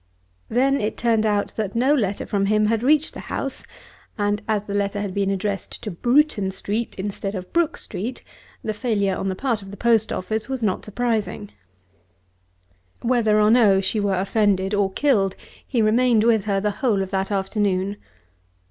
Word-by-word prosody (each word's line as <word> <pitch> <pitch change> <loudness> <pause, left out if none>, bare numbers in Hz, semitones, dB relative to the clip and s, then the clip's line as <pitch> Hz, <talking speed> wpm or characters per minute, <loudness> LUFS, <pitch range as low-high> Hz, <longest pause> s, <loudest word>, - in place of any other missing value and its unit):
Then 270 +3 +2
it 210 - -2
turned 225 -2 +2
out 205 -1 0
that 210 -2 -2
no 260 +5 +3
letter 205 -8 0
from 195 -1 0
him 215 +1 +3
had 225 +1 +1
reached 295 +4 +3
the - - -8
house; - - -3 0.5
and 205 0 0
as 215 -2 0
the 200 - -6
letter 200 0 -1
had 200 -2 -3
been 200 0 0
addressed 195 +1 -3
to 210 - -4
Bruton 240 - +2
Street 205 +4 -3
instead 195 +1 -4
of 180 -1 -7
Brook 335 -2 +1
Street, 240 +7 -5 0.4
the 215 - -2
failure 210 -4 0
on 195 - -2
the 190 - -2
part 235 -1 -1
of 195 - -11
the 200 - -9
post 225 -1 +2
office 215 +6 -3
was 260 -3 -3
not 195 -4 0
surprising. 215 -2 -2 1.5
Whether 230 -3 +3
or 210 0 +4
no 215 -5 +5
she 195 +3 -1
were 200 -2 +1
offended 195 0 +1
or 200 -1 +2
he 190 - -21
killed 205 -10 +2 0.3
he 235 -4 +1
remained 230 +1 +3
with 225 -3 +3
her 200 -2 +1
the 210 +1 0
whole 215 -7 +2
of 190 - -8
that 190 -1 -1
afternoon. 200 -1 -1
210 Hz, 185 wpm, -22 LUFS, 195-230 Hz, 1.5 s, no